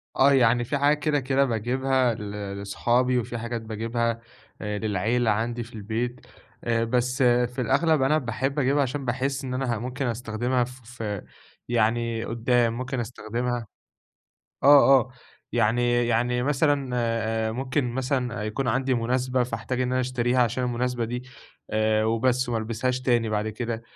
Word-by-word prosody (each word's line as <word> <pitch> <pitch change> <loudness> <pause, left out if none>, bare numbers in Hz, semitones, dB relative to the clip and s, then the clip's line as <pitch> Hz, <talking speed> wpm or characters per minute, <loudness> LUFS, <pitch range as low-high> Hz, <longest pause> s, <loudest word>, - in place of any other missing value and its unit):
آه، 140 +1 +5
يعني 120 -2 +4
في 140 +4 -1
حاجات 145 +2 +3
كده 150 -1 +1
كده 135 +1 +2
باجيبها 130 +2 +1
ل 105 -2 -6 0.3
لصحابي، 120 +5 +1
وفي 120 0 -3
حاجات 115 0 -4
باجيبها 115 +1 -2 0.4
آآ 105 -1 -3
للعيلة 110 +3 +1
عندي 120 +3 -1
في 115 - -14
البيت، 115 +4 -3 0.4
آآ، 115 -1 +1
بس 125 +2 0
في 125 +1 +2
الأغلب 145 +5 +2
أنا 135 +4 +3
باحب 135 +2 -2
أجيبها 140 +2 +2
علشان 140 +1 -2
باحس 135 +3 -1
إن 130 -1 -4
أنا 130 -2 -1
ه - - -4
ممكن 130 +3 -3
أستخدمها 120 +2 -1
ف 125 +1 -9 0.2
ف 105 -2 -3 0.5
يعني 115 0 +1
قدّام 120 0 +1
ممكن 130 0 -3
أستخدمها. 120 +1 -3 1.0
آه، 135 -1 +7
آه، 125 - -13 0.4
يعني 120 +2 +2
يعني 120 +1 +1
مثلًا 140 -1 +1
آآ 115 -2 0
ممكن 130 +1 -1
مثلًا 125 -3 -1
يكون 115 +5 -2
عندي 130 +2 +1
مناسبة 125 +2 0
فاحتاج 125 +1 -3
إن 125 0 0
أنا 130 - +2
أشتريها 125 0 0
علشان 125 +2 0
المناسبة 125 0 -1
دي 120 +2 -4 0.5
آآ، 110 0 +2
وبس 120 +3 +1
وما 115 -2 0
البسهاش 115 +3 -2
تاني 120 -3 +2
بعد 105 0 -1
كده، 115 +1 -4
120 Hz, 155 wpm, -25 LUFS, 115-130 Hz, 1.0 s, آه